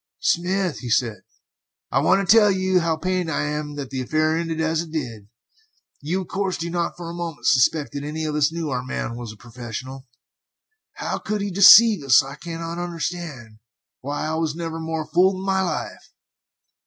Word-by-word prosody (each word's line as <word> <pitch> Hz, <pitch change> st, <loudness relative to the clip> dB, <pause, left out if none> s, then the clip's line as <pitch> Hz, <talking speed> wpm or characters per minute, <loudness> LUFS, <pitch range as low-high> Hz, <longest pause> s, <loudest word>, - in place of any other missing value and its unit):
"Smith," 180 Hz, 0 st, 0 dB
said 115 Hz, -2 st, +1 dB
he, -, -, -37 dB, 0.5 s
"I -, -, +2 dB
want 195 Hz, +1 st, +2 dB
to 220 Hz, -, +7 dB
tell 210 Hz, -2 st, +6 dB
you 185 Hz, -1 st, +2 dB
how 165 Hz, -2 st, 0 dB
pained 180 Hz, 0 st, -1 dB
I 160 Hz, -, -1 dB
am 150 Hz, 0 st, -3 dB
that 140 Hz, -3 st, -6 dB
the 130 Hz, -1 st, -3 dB
affair 155 Hz, +4 st, +1 dB
ended 165 Hz, -1 st, -2 dB
as 160 Hz, 0 st, 0 dB
it 170 Hz, -, -8 dB
did. 120 Hz, -10 st, -5 dB, 0.7 s
You, 170 Hz, +7 st, -2 dB
of 185 Hz, -, -8 dB
course, 190 Hz, 0 st, -2 dB
do 170 Hz, +1 st, -4 dB
not 170 Hz, 0 st, -2 dB
for 175 Hz, -1 st, -7 dB
a 170 Hz, -, -6 dB
moment 170 Hz, -3 st, -6 dB
suspect 140 Hz, +3 st, +3 dB
that 140 Hz, -, -5 dB
any 155 Hz, +2 st, -4 dB
of 155 Hz, -, -2 dB
us 150 Hz, 0 st, +2 dB
knew 165 Hz, -3 st, -4 dB
our 125 Hz, -1 st, -1 dB
man 125 Hz, -2 st, -4 dB
was 120 Hz, -2 st, -7 dB
a 110 Hz, -, -14 dB
professional. 125 Hz, +3 st, -8 dB, 0.9 s
How -, -, -4 dB
he -, -, -25 dB
could 205 Hz, -2 st, -2 dB
deceive 205 Hz, 0 st, +8 dB
us 135 Hz, 0 st, +6 dB
I 135 Hz, +1 st, -8 dB
cannot 165 Hz, +2 st, -6 dB
understand. 165 Hz, -10 st, -6 dB, 0.4 s
Why, 145 Hz, +3 st, -4 dB
I 155 Hz, -, -2 dB
was 160 Hz, -1 st, -1 dB
never 165 Hz, -1 st, -5 dB
more 160 Hz, -1 st, -3 dB
fooled 185 Hz, +4 st, +3 dB
in 190 Hz, +1 st, -6 dB
my 190 Hz, -1 st, +1 dB
life!" 175 Hz, -5 st, -4 dB
160 Hz, 195 wpm, -22 LUFS, 140-175 Hz, 0.9 s, deceive